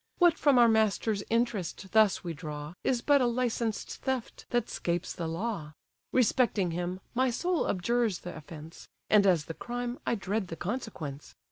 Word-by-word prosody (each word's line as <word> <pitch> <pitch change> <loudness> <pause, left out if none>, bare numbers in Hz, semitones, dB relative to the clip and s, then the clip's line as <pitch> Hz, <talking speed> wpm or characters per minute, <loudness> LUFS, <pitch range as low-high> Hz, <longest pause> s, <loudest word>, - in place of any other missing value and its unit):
What 350 -2 +5
from 285 -5 +4
our 240 -1 +7
master's 220 -1 +2
interest 220 -5 -1
thus 215 -2 +4
we 170 -2 -3
draw, 150 -1 -6
Is 245 -3 +1
but 285 -2 +5
a 250 - +3
licensed 235 -2 -1
theft 265 -3 -4
that 240 -2 +1
'scapes 175 +1 -2
the 170 - -4
law. 165 -2 -3 0.4
Respecting 230 -6 +2
him, 175 +2 -3
my 255 +1 +2
soul 350 +8 0
abjures 220 +1 +1
the 180 - -7
offence; 155 +1 -10 0.2
And 205 -2 +6
as 170 -5 +3
the 165 - -5
crime, 245 +5 -4
I - - 0
dread 200 0 -2
the 165 - -6
consequence. 175 - -5
215 Hz, 165 wpm, -30 LUFS, 175-240 Hz, 0.4 s, our